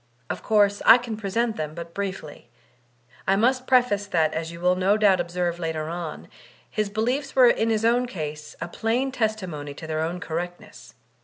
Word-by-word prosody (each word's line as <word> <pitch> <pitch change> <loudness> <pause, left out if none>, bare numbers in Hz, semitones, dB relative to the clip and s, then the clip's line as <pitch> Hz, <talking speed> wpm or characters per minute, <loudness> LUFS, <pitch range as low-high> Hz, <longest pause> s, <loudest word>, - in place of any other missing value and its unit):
Of - - -5
course, 205 -2 +3
I 230 - +9
can 240 -3 -5
present 220 +2 -1
them 155 0 -4
but 170 0 -8
briefly. 190 -10 -6 0.8
I 195 - +4
must 255 +5 +1
preface 245 -6 +3
that, 160 -5 +1
as 160 +1 -3
you 170 - -9
will 180 +1 +3
no 190 +3 +2
doubt 200 -4 +4
ob 175 0 -2
serve 175 -1 -2
later 160 -2 -3
on, 170 -2 -6 0.4
his 215 -1 -1
beliefs 250 +7 -1
were 260 -2 +7
in 225 -1 +1
his 220 0 +1
own 245 +2 +3
case 150 -7 -6
a - - -4
plain 235 +8 -1
testimony 185 - -3
to 160 - -9
their 155 0 -2
own 170 +3 -2
correctness. 175 +1 -6
195 Hz, 185 wpm, -24 LUFS, 165-225 Hz, 0.8 s, I